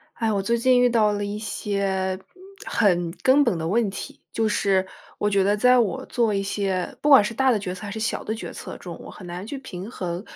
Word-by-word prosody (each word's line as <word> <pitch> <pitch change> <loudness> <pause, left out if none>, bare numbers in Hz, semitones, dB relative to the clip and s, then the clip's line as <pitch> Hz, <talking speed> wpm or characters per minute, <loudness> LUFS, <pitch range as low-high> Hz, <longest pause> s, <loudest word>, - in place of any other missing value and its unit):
哎， 225 -1 0
我 200 -2 0
最 235 +4 +1
近 250 +1 +4
遇 245 - +5
到 215 -3 +3
了 205 0 -2
一 205 +1 -4
些 195 -3 -2 0.5
很 175 -5 +2
根 270 +3 +5
本 235 -8 +1
的 160 - -3
问 220 +3 +2
题。 195 - -8
就 225 - 0
是 195 -2 +1 0.3
我 210 - +1
觉 195 -1 +3
得 205 +2 +2
在 250 +4 +5
我 245 +3 0
做 235 -4 +1
一 195 - +1
些 195 -2 -2
不 295 - 0
管 270 -8 +8
是 230 - -2
大 265 +2 +3
的 220 - +2
决 185 -2 -4
策 185 - -11
还 200 - -5
是 220 - -5
小 225 +1 -2
的 220 - -3
决 225 - -7
策 - - -8
中， - - -9
我 - - -10
很 185 - -11
难 175 +3 -6
去 280 - -5
平 205 -6 -8
衡。 180 -5 -4
205 Hz, 260 characters per minute, -24 LUFS, 190-235 Hz, 0.5 s, 管